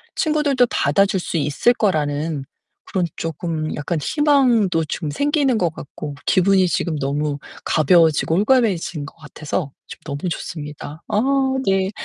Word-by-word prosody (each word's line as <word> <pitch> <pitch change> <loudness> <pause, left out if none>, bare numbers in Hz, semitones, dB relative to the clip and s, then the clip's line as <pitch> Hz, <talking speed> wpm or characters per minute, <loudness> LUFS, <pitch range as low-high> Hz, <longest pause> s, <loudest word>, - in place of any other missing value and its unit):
친구들도 295 -5 +2
받아줄 195 +6 +2
수 175 - -5
있을 150 - +2
거라는 150 - -1 0.4
그런 185 -2 -1
쪼금 160 -1 -3
약간 150 +3 -2
희망도 245 - +2
좀 150 0 -4
생기는 285 - +1
것 175 -5 +1
같고, 145 0 -8
기분이 190 0 +3
지금 170 -2 -1
너무 145 +1 -1 0.3
가벼워지고 160 0 +3
홀가분해진 200 - +1
것 - - -12
같아서 150 -1 -5 0.2
좀 - - -10
너무 145 +4 -3
좋습니다. 150 -1 -7
아, 210 - +1 0.4
네. 190 0 +2
170 Hz, 295 characters per minute, -20 LUFS, 150-205 Hz, 0.4 s, 기분이